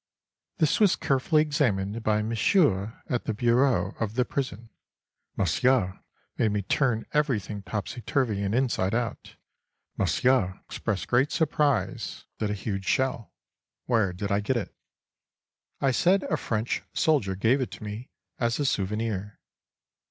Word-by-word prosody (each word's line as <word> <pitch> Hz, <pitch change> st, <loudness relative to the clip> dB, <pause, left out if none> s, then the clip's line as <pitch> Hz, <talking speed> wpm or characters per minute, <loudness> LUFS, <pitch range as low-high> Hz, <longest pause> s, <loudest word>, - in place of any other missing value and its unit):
This 155 Hz, -6 st, +2 dB
was 205 Hz, -4 st, +5 dB
carefully 145 Hz, +3 st, +2 dB
examined 115 Hz, -8 st, 0 dB
by 105 Hz, -1 st, +1 dB
Monsieur 110 Hz, -, +2 dB
at 125 Hz, -, -2 dB
the 110 Hz, -, -2 dB
bureau, 120 Hz, -4 st, +2 dB
of 110 Hz, -1 st, -2 dB
the 125 Hz, 0 st, +2 dB
prison. 115 Hz, -6 st, -4 dB, 0.7 s
Monsieur 125 Hz, -8 st, +2 dB, 0.4 s
made 110 Hz, -2 st, +2 dB
me 105 Hz, -1 st, -1 dB
turn 115 Hz, +1 st, +1 dB
everything 110 Hz, -9 st, 0 dB
topsy 105 Hz, +4 st, -5 dB
turvy 115 Hz, -4 st, 0 dB
and 100 Hz, +2 st, 0 dB
inside 115 Hz, -6 st, +1 dB
out. 120 Hz, -1 st, -3 dB, 0.6 s
Monsieur 105 Hz, -8 st, +2 dB
expressed 105 Hz, -4 st, -3 dB
great 130 Hz, +4 st, +2 dB
surprise 150 Hz, -5 st, 0 dB
at 105 Hz, -, 0 dB
a 105 Hz, -, -1 dB
huge 95 Hz, -1 st, -4 dB
shell: 130 Hz, -2 st, 0 dB, 0.5 s
where 110 Hz, -6 st, +2 dB
did 100 Hz, +3 st, -4 dB
I 100 Hz, -, +3 dB
get 115 Hz, +5 st, 0 dB
it?—I 130 Hz, +4 st, -7 dB
said 185 Hz, +9 st, +3 dB
a -, -, 0 dB
French 115 Hz, -5 st, -2 dB
soldier 125 Hz, -12 st, +2 dB
gave 115 Hz, +8 st, +2 dB
it 130 Hz, -, -2 dB
to -, -, -10 dB
me 105 Hz, +4 st, -6 dB, 0.3 s
as 120 Hz, +1 st, 0 dB
a 145 Hz, -, +1 dB
souvenir. 105 Hz, -2 st, -2 dB
115 Hz, 135 wpm, -27 LUFS, 105-130 Hz, 0.7 s, was